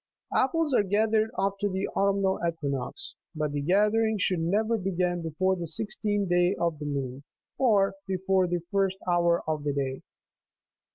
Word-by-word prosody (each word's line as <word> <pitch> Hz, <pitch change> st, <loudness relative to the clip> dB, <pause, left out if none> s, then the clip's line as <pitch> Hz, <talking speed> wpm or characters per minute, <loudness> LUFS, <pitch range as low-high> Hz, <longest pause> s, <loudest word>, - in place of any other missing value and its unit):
Ap 260 Hz, -, +4 dB
ples 325 Hz, -3 st, 0 dB
are 245 Hz, -, +5 dB
gathered 215 Hz, +2 st, +2 dB
after 200 Hz, +1 st, 0 dB
the 190 Hz, +1 st, -2 dB
autumnal 195 Hz, -1 st, +1 dB
equinox; 165 Hz, -, -3 dB, 0.2 s
but 155 Hz, -1 st, -1 dB
the 145 Hz, 0 st, -2 dB
gather 210 Hz, +8 st, +3 dB
ing 220 Hz, -1 st, +1 dB
should 185 Hz, -2 st, 0 dB
never 210 Hz, +7 st, +1 dB
begin 180 Hz, -3 st, -1 dB
before 175 Hz, +4 st, 0 dB
the 175 Hz, -2 st, -4 dB
sixteenth 205 Hz, +3 st, 0 dB
day 175 Hz, +2 st, +3 dB
of 170 Hz, -3 st, -1 dB
the 150 Hz, -, -5 dB
moon, 135 Hz, -2 st, -3 dB, 0.4 s
or 205 Hz, -7 st, +3 dB
before 190 Hz, 0 st, +1 dB
the 175 Hz, -1 st, -2 dB
first 195 Hz, -1 st, +1 dB
hour 170 Hz, -1 st, +2 dB
of 155 Hz, -2 st, -1 dB
the 145 Hz, -1 st, -1 dB
day. 135 Hz, -2 st, -2 dB
190 Hz, 165 wpm, -27 LUFS, 165-205 Hz, 0.4 s, are